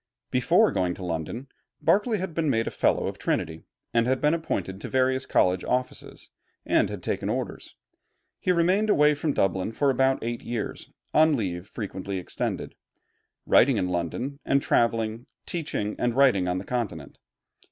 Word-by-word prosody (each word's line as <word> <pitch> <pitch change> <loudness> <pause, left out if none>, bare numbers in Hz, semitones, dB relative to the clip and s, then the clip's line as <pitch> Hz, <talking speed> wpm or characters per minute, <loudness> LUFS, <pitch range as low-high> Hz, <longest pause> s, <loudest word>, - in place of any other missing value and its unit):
Before - - +4
going 90 -1 0
to 95 - -7
London, 85 - -4 0.3
Berkeley 215 +2 +2
had 190 -3 -4
been 160 -2 0
made 115 -3 +1
a - - -3
Fellow - - +1
of - - -4
Trinity, 80 0 -2 0.3
had 125 +3 +2
been 150 +1 +3
appointed 105 - -3
to - - -6
various 130 0 +1
college 90 0 +2
offices, 125 0 -3 0.3
and - - +2
had - - -7
taken - - -2
orders. - - -4 0.6
He 185 - +1
remained 185 +5 +2
away 150 -5 +5
from 145 +1 -1
Dublin 95 +2 0
for 140 +4 +2
about 135 +1 +2
eight 120 +1 -3
years, 115 -3 -5 0.2
on 155 0 +5
leave 90 -4 -3
frequently 100 -3 -5
extended, 90 - -3 0.7
writing - - +5
in 90 - 0
London, 90 - -3
and 140 - +2
traveling, 115 -2 0 0.2
teaching, 145 -11 -3
and 120 -1 0
writing 125 -10 +4
on 90 0 0
the 95 - -4
Continent. 120 -4 -4
120 Hz, 160 wpm, -26 LUFS, 95-145 Hz, 0.7 s, away